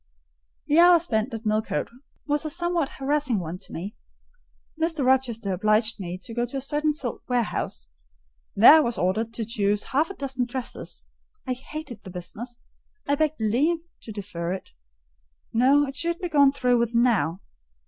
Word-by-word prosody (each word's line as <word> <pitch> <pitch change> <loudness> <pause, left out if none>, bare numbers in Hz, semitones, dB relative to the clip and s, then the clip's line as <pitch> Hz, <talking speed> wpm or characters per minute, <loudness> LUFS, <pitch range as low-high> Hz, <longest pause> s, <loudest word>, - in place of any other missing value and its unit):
The 300 +3 +3
hour 350 0 +8
spent 250 -7 -1
at 225 0 -6
Millcote 215 +1 -1 0.3
was 295 0 0
a 310 - -3
somewhat 345 -2 0
harassing 275 -3 0
one 175 -1 -5
to - - -12
me. 195 +6 -6 0.9
Mr. 325 -4 0
Rochester 245 -6 +1
obliged 215 +3 +1
me 180 -1 -5
to 230 - -8
go 240 +1 -1
to 275 - -5
a - - -2
certain 295 +3 0
silk 280 -5 -5
warehouse: 230 - -2 0.7
there 240 +9 +9
I - - +6
was 240 -6 0
ordered 215 +5 0
to 225 - -3
choose 205 -2 0
half 305 +6 +2
a 390 - -7
dozen 265 -3 -2
dresses. 250 0 -5 0.4
I 255 - -1
hated 260 -2 -8
the 190 - -9
business, 235 +7 -8 0.5
I 285 - +2
begged 310 0 0
leave 275 +10 +1 0.2
to 225 - -8
defer 185 -4 -4
it: 190 - -8 0.8
no—it 270 +3 +3
should 335 +4 -1
be 355 -1 -4
gone 285 -3 +5
through 250 -3 +2
with 235 0 -1
now. 205 -8 +2
245 Hz, 170 wpm, -25 LUFS, 215-290 Hz, 0.9 s, there